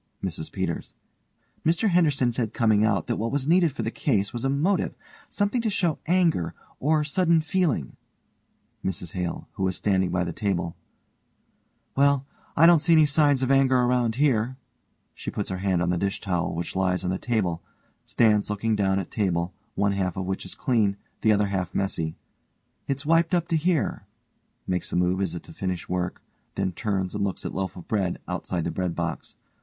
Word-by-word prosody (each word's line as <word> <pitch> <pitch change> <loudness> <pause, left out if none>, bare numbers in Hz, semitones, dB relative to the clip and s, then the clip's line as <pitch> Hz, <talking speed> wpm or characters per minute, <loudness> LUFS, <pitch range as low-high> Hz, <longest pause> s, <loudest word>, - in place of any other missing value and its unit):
MRS 80 -4 -4
PETERS: - - -3 0.7
Mr 170 +6 +2
Henderson 150 -8 +3
said 115 -2 -2
coming 110 -4 +3
out 100 -6 +2
that - - -1
what 115 +2 -2
was 140 -1 -1
needed 170 -1 +4
for 140 - -4
the - - -2
case 105 -8 0
was 120 0 -4
a 135 - +1
motive; 160 +8 +1 0.3
something 205 +4 0
to 225 - 0
show 175 -6 0
anger, 170 - +2 0.2
or 155 +2 +2
sudden 165 +2 +3
feeling. 160 - 0 0.9
MRS 90 -2 -3
HALE: 90 -2 -3
(who 95 - -1
is 95 - -1
standing 95 -3 +1
by 90 0 0
the 85 -1 -4
table) 85 -4 -1 1.2
Well, 140 0 +3 0.3
I 165 - +7
don't 170 -1 +7
see 170 +3 +3
any 155 -1 +7
signs 145 -2 +3
of 130 - +1
anger 135 -1 +4
around 125 -2 +2
here, 130 -3 +1 0.6
(_she - - -5
puts 105 - -3
her 95 - -2
hand 95 -2 +1
on 85 - +1
the 90 - 0
dish 100 +1 -1
towel 90 -4 -1
which 85 +1 -4
lies 90 -1 +1
on 90 - 0
the 95 - -2
table, 95 -9 -1 0.4
stands 105 -3 +2
looking 110 +2 0
down 95 -2 +1
at 95 - -4
table, 90 -4 0 0.2
one 100 0 +2
half 95 -3 -1
of 95 - -2
which 95 +1 -3
is - - -6
clean, 110 -7 +1 0.2
the 110 - +4
other 105 -1 +2
half 95 -2 -2
messy_) 85 -5 -1 0.7
It's 140 +1 -2
wiped 165 +1 +4 0.2
to 165 - +2
here, 160 0 0 0.6
(_makes 90 -1 -2
a - - -2
move 90 +2 +2
as 90 -3 -1
if 85 - -6
to - - -13
finish 90 0 -3
work, 90 0 -3 0.3
then 95 -1 0
turns 95 -1 -2
and 105 -1 -1
looks 100 -2 -3
at - - -3
loaf 95 -1 -3
of 90 - -10
bread 95 -5 0
outside 90 -1 -2
the 85 - -2
breadbox. 90 0 -3
105 Hz, 190 wpm, -26 LUFS, 90-140 Hz, 1.2 s, I